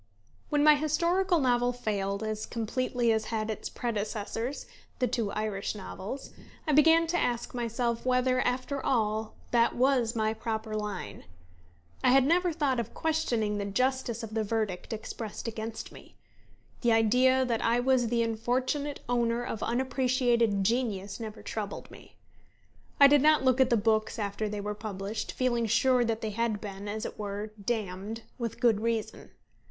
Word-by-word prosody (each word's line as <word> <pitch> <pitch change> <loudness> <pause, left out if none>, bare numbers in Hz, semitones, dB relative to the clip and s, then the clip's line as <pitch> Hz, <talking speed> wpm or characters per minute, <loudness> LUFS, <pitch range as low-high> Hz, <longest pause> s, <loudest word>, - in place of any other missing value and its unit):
When 295 -1 +2
my 305 0 +8
historical 340 +5 +2
novel 245 -2 +2
failed, 200 -4 -2
as 215 0 -3
completely 240 +1 0
as 220 -1 +1
had 220 -1 -2
its 215 - -5
predecessors, 225 +3 -3 0.3
the 250 - +1
two 230 -4 -1
Irish 215 -1 -2
novels, 210 +5 -7 0.3
I 310 - +1
began 325 +3 +6
to 350 +2 0
ask 240 -1 -1
myself 235 -1 -1
whether, 255 0 +2
after 255 +2 -1
all, 220 -3 0 0.2
that 235 -1 +3
was 250 -2 +2
my 220 -1 +1
proper 220 -1 -4
line. 210 - -5 0.8
I - - +5
had 265 +1 +6
never 350 +4 +3
thought 290 -6 0
of 235 - -5
questioning 235 -10 0
the 200 - -2
justice 250 +2 -1
of 220 -1 -7
the 220 -1 0
verdict 215 -3 -2
expressed 220 0 -6
against 225 0 -5
me. - - -15 0.7
The 235 -2 +3
idea 255 +4 +4
that 235 -3 -1
I 235 +1 +3
was 250 -1 +2
the 235 0 +1
unfortunate 255 +6 -1
owner 235 -1 +1
of 225 - -4
unappreciated 245 -4 +1
genius 210 -3 -1
never 220 -1 -7
troubled 210 -2 -5
me. - - -15 0.8
I 280 - +10
did 285 0 +6
not 305 -1 +5
look 260 0 +4
at 260 - +4
the 235 - +4
books 215 +1 +1
after 210 0 -2
they 205 0 -4
were 210 +1 -3
published, 210 0 -5
feeling 240 -3 0
sure 250 +3 +3
that 225 -1 -1
they 220 - -2
had 225 0 -1
been, 200 -1 -7
as 215 +1 -3
it - - -7
were, 205 +1 -4
damned 215 0 -3 0.2
with 235 -1 -4
good 230 -4 +3
reason. 225 -1 -2
230 Hz, 160 wpm, -29 LUFS, 215-255 Hz, 0.8 s, I